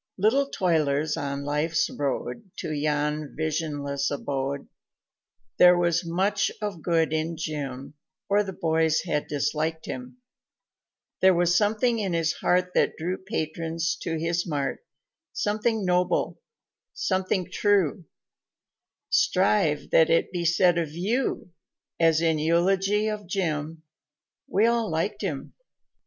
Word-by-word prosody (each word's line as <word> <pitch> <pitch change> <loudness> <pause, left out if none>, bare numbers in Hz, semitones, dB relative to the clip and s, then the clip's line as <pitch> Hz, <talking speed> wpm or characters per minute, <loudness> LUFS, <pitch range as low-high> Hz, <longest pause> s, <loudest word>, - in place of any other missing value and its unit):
Little 255 +8 +2
toilers 155 - +1
on 140 0 -3
Life's 150 +2 +1
road 145 - -4
To - - -4
yon 150 0 -1
visionless 145 -3 -2
abode, 140 -1 -3 0.9
There 180 0 +8
was 175 -1 +1
much 195 +4 +1
of 205 -6 -4
good 165 -1 +1
in 160 +1 -1
Jim 140 -4 -5 0.3
Or 205 +1 +3
the 195 - -5
boys 160 -2 +1
had 150 -4 -2
disliked 155 +3 -1
him; 250 0 -7 1.0
There 190 -1 +5
was 175 0 +2
something 220 +4 +2
in 195 -4 -1
his 165 -1 +1
heart 180 0 +1
That - - +2
drew 175 +3 -2
patrons 165 -3 -2
to 165 -1 -2
his 170 +2 -1
mart, 145 - -2 0.5
Something 215 0 0
noble, 180 0 +1 0.5
something 185 -1 -1
true 190 -5 +1 1.1
Strive 145 +7 +2
that 160 - +5
it 165 - +2
be 175 -2 -2
said 175 +1 +4
of 155 -3 -3
you 200 +2 -1 0.5
As 165 -1 +4
in 160 -2 +2
eulogy 195 +6 +2
of 210 -3 -4
Jim, 160 -4 -2 0.6
"We 205 +3 +2
all 235 -2 +1
liked 195 +6 -2
him." 160 -9 -4
165 Hz, 125 wpm, -26 LUFS, 155-190 Hz, 1.1 s, There